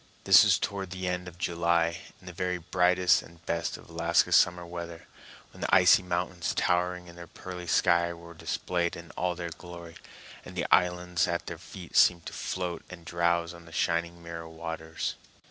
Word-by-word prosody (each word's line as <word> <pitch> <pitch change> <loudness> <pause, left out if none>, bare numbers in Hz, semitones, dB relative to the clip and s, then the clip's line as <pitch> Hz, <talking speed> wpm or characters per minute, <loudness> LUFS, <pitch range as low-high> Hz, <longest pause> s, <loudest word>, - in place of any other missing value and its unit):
This - - +8
was - - +4
toward 100 -2 -3
the 95 0 -4
end 90 0 -2
of 90 -1 -10
July, 85 0 +1 0.2
in 90 - -19
the 90 - -8
very 90 0 -1
brightest 90 +1 +3
and 85 0 -17
best 85 0 -2
of - - -15
Alaska 85 0 +2
summer 90 0 +4
weather, 85 -1 -7 0.5
when - - -13
the - - -1
icy 90 0 +6
mountains 90 -1 -2
towering 90 0 +1
in 85 -1 -13
the 85 -1 -9
pearly 90 0 -8
sky 85 +1 +3
were 85 0 -11
displayed 85 +1 -2
in 85 0 -10
all 90 -1 -1
their 85 -1 -5
glory, 85 0 -10 0.5
and - - -11
the - - -1
islands 90 0 +2
at 85 0 -2
their 85 - -7
feet 90 0 -11
seemed 85 -2 +5
to - - -7
float 90 -2 -4
and 85 -2 -11
drowse 85 0 0
on 85 0 -13
the 85 - -14
shining 85 +1 -1
mirror 85 -1 -7
waters. 80 0 -4
85 Hz, 185 wpm, -29 LUFS, 85-90 Hz, 0.5 s, This